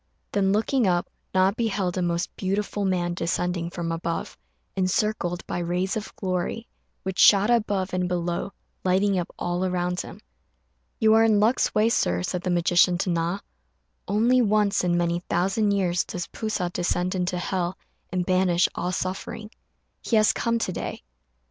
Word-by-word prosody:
Then, 195 -1 +2
looking 225 +3 +2
up, 175 -1 +1 0.3
Na 185 +1 +4
beheld 200 -5 -1
a 185 - -1
most 175 +1 -1
beautiful 200 +1 -2
man 175 -2 0
descending 175 0 -1
from 170 -1 -4
above, 165 0 -3 0.4
encircled 185 -1 0
by - - -3
rays 180 +2 -1
of 220 -1 -5
glory, 185 +4 -2 0.4
which 190 0 -4
shot 205 +1 +6
forth 240 -1 +5
above 195 -3 -2
and 180 0 0
below, 175 +1 -2 0.3
lighting 190 +1 +2
up 175 - -4
all 175 +1 -2
around 180 -1 -1
him. - - -10 0.8
"You 220 0 +4
are 225 0 +6
in 215 -2 +4
luck's 225 +5 +2
way, 215 +1 +4
Sir," 90 - +1
said 180 - -2
the 185 - -3
magician 175 +1 +3
to 180 - -1
Na; 170 +3 -1 0.7
"only 235 +5 +3
once 210 -3 +2
in 175 -1 +2
many 170 0 +1
thousand 195 +5 +1
years 185 -3 +1
does 175 -1 -5
P'u 220 - -5
sa 180 -5 -1
descend 180 +1 -1
into 180 -1 -1
hell 180 0 -2 0.3
and 180 -1 -1
banish 185 -1 +3
all 180 +1 -2
suffering. 190 +4 -4 0.5
He 230 - 0
has 215 -1 +5
come 230 0 0
to 225 - -2
day." - - -5
185 Hz, 165 wpm, -25 LUFS, 175-205 Hz, 0.8 s, shot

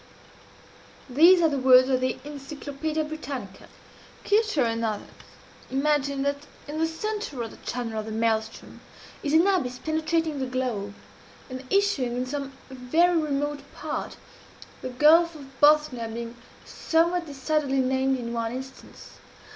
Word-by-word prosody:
These 340 +7 +7
are - - +6
the 285 -3 -1
words 255 0 +7
of 255 -1 +2
the 255 - 0
"Encyclopædia 295 +2 -4
Britannica." 275 -10 -7 0.6
Kircher 420 - +2
and 230 0 -1
others 215 -2 -2 0.6
imagine 280 0 0
that 285 +1 -2 0.2
in 300 +2 -5
the 325 - +2
centre 325 - -4
of 225 - -7
the - - -13
channel 230 -3 -4
of 215 - -6
the - - -5
Maelström 220 0 -2 0.4
is 285 - -2
an 325 +3 +6
abyss 295 -11 +1
penetrating 315 0 -1
the 260 - -2
globe, 240 -6 -3 0.6
and 255 +1 -6
issuing 390 -12 +1
in 250 - -1
some 275 +1 -5 0.2
very 290 +8 +2
remote 290 -2 -1 0.2
part 310 0 -5 0.6
the 255 - -4
Gulf 320 +6 +5
of 290 -3 -10 0.2
Bothnia 295 -6 +4
being 235 +1 -6 0.3
somewhat 340 +1 +1
decidedly 280 0 -1
named 265 0 +1
in 235 -1 -5
one 230 -1 -2
instance. 265 +2 -10
275 Hz, 140 wpm, -26 LUFS, 250-315 Hz, 0.6 s, These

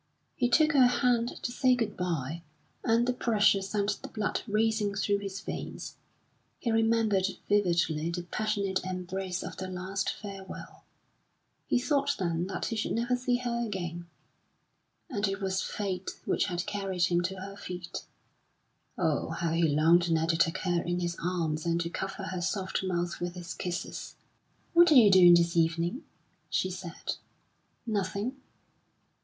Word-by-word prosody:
He 245 - +1
took 310 +5 +5
her 265 -4 +6
hand 245 -1 +2 0.2
to 240 - -1
say 255 0 +3
good 225 -4 -2
bye, 165 -3 -2 0.4
and 230 0 +3
the 250 - +2
pressure 210 -5 +3
sent 200 +1 -1
the - - -6
blood 215 -1 -2
racing 215 -1 +1
through 200 0 +1
his 195 -1 -5
veins. - - -6 0.6
He 235 - -1
remembered 225 -3 +3 0.2
vividly 170 -6 +2
the 175 +1 -3
passionate 200 0 -1
embrace 185 0 -3
of - - -7
their 185 0 -5
last 185 +1 -2
farewell. 195 -2 -9 0.8
He - - +3
thought 280 +2 +1
then 170 -1 -1
that 190 - -3
he 225 - -2
should 215 - -1
never 240 +2 +1
see 250 0 0
her 240 -1 -1
again, 175 -5 -4 1.0
and 205 0 -1
it 195 0 -2
was 190 -1 -1
Fate 190 -3 -4
which - - +1
had 175 +1 -2
carried 195 -3 -2
him 175 -1 +3
to 185 +2 -2
her 195 +1 -7
feet. 180 -3 -6 0.9
Oh, 160 -5 0
how 165 0 -2
he 165 +1 +1
longed 165 +4 +4
now 160 0 +3
to 165 0 +1
take 165 -1 +2
her 175 -2 +1
in 175 +1 -1
his 175 -1 -2
arms 165 -4 -1
and 170 0 +1
to 170 0 -2
cover 195 +2 -4
her 185 -2 -4
soft 190 +1 -1
mouth 175 -2 -1
with 175 0 -3
his 175 -1 -6
kisses! 180 0 -5 0.6
"What 345 -1 +7
are - - +7
you 220 -6 +8
doing 175 -2 +9
this 170 0 +2
evening?" 170 - +1 0.4
she 185 - 0
said. 180 -2 -5 0.7
"Nothing." 210 +3 -2
190 Hz, 160 wpm, -29 LUFS, 175-215 Hz, 1.0 s, doing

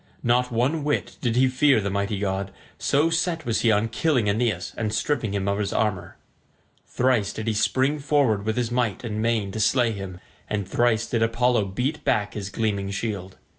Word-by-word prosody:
Not 125 +1 +2
one 130 +7 0
whit 145 0 -1
did 120 -3 0
he 130 +1 +4
fear 130 0 +3
the 100 -1 -2
mighty 100 +1 -1
god, 95 0 -2 0.3
so 150 +4 +2
set 165 -1 0
was 115 -2 0
he 115 - +4
on 105 +1 +2
killing 125 -1 +1
Aeneas 100 -4 0
and 110 -2 -2
stripping 120 -4 -1
him 100 -1 -1
of 100 +1 0
his 100 -1 -1
armour. 105 -5 -1 0.7
Thrice 120 -5 +1
did 110 - -6
he 115 - 0
spring 130 +7 +1
forward 140 -8 +2
with 115 +2 -1
might 120 -4 -1
and 110 -2 -3
main 110 -3 0
to 110 - -5
slay 120 +2 +3
him, 95 -3 -7 0.3
and 100 -3 -2
thrice 115 -2 +2
did 115 - -1
Apollo 115 -1 +2
beat 125 +10 -3
back 105 -7 0
his 100 -2 -5
gleaming 105 -2 -1
shield. 100 -2 -4
115 Hz, 190 wpm, -24 LUFS, 100-125 Hz, 0.7 s, he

